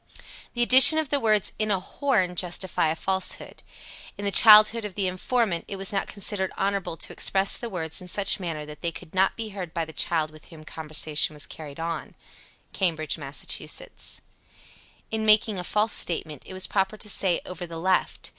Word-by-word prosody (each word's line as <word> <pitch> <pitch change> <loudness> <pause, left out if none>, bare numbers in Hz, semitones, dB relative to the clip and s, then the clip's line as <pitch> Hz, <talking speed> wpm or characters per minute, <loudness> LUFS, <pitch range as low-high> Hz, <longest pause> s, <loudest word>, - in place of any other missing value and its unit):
_ - - -28
70. - - -15 0.3
The 240 - +2
addition 260 +6 +8
of 315 -3 -1
the 285 -1 +1
words 215 -4 +2
"in 215 0 -1
a 195 -2 +1
horn" 190 -4 -1
justify 175 -1 +1
a 155 - -1
falsehood. 190 +2 -2 0.6
In 205 - -6
the 200 - +1
childhood 215 +2 +7
of 210 -3 -7
the 200 - -2
informant, 185 0 -1
it 200 - -6
was 195 +1 -3
not 195 - -2
considered 200 -2 -1
honorable 195 -4 -2
to - - -4
express 195 0 +2
the 235 - -6
words 165 -2 -4
in 180 - -11
such 200 +2 0
manner 165 -5 -5
that 150 0 -12
they 170 - -2
could 160 - -13
not 190 +1 +1
be 225 -1 -5
heard 185 -5 -8
by 165 -1 -2
the 160 - -12
child 155 -2 0
with 155 -1 -16
whom 155 -2 -14
conversation 155 -1 0
was 150 - -5
carried 150 -1 -10
on. 165 -1 -5 0.6
Cambridge, 160 -4 -2
Mass. 140 -1 -7
71. - - -3 1.2
In 220 0 -2
making 215 -2 +3
a - - -5
false 210 +4 0
statement, 155 -4 +2
it - - -10
was 185 0 -1
proper 195 +1 -1
to 210 - -9
say 190 -4 0
"over 180 -1 -8
the 165 0 -8
left." 185 +2 -1
190 Hz, 200 wpm, -25 LUFS, 165-210 Hz, 1.2 s, addition